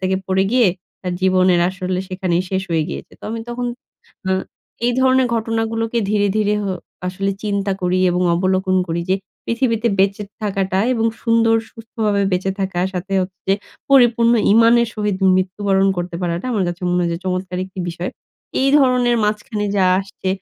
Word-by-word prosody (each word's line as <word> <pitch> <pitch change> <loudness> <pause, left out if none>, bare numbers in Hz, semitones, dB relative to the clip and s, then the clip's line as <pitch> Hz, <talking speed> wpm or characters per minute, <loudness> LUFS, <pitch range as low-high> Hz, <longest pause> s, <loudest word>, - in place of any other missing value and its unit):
থেকে 190 0 0
পড়ে 190 0 +2
গিয়ে 245 -6 +5 0.4
আ - - +1
জীবনের 185 -1 +3
আসলে 185 0 -3
সেখানেই 185 -1 0
শেষ 190 0 0
হয়ে 160 -2 +2
গিয়েছে। - - -7
তো, - - -12
আমি 225 0 -4
তখন 245 +1 -3 0.6
আ - - +1 0.6
এই 245 - +2
ধরনের 260 0 +4
ঘটনাগুলোকে 225 +1 -1
ধীরে, 205 -1 +2
ধীরে 210 0 +2
হ - - -2 0.4
আসলে 195 +2 -2
চিন্তা 200 -1 0
করি 180 +1 +1
এবং 180 +1 0
অবলোকন 185 +1 +1
করি 165 +1 -1
যে 190 - +4 0.3
পৃথিবীতে 230 -1 +1
বেঁচে 195 +2 +2 0.2
থাকাটা 195 -2 -1
এবং 225 -2 +1 0.2
সুন্দর, 230 -1 +3
সুস্থভাবে 220 -3 -2
বেঁচে 185 +1 0
থাকা, 190 -2 -1
সাথে 190 +2 -4
হচ্ছে 185 0 -8
যে 195 - +5 0.4
পরিপূর্ণ 235 -3 +5 0.2
ঈমান 230 +1 +6
এর 235 - -1
সহিত 210 -3 -1 0.2
মৃত্যু 185 +2 -2
বরণ 195 0 +4
করতে 175 -1 -3
পারাটা, 175 +5 -2
আমার 200 -4 +1
কাছে 175 +2 -6
মনে 180 - +2
হয় 170 - 0
যে 170 - -4
চমৎকার 185 0 -2
একটি 190 0 -13
বিষয়। 170 +1 -4 0.5
এই 270 - +3
ধরনের 250 -3 +3
মাঝখানে 210 0 -2
যা 190 -2 +4
আসছে, 195 -1 -6
195 Hz, 175 wpm, -19 LUFS, 185-225 Hz, 0.6 s, ঈমান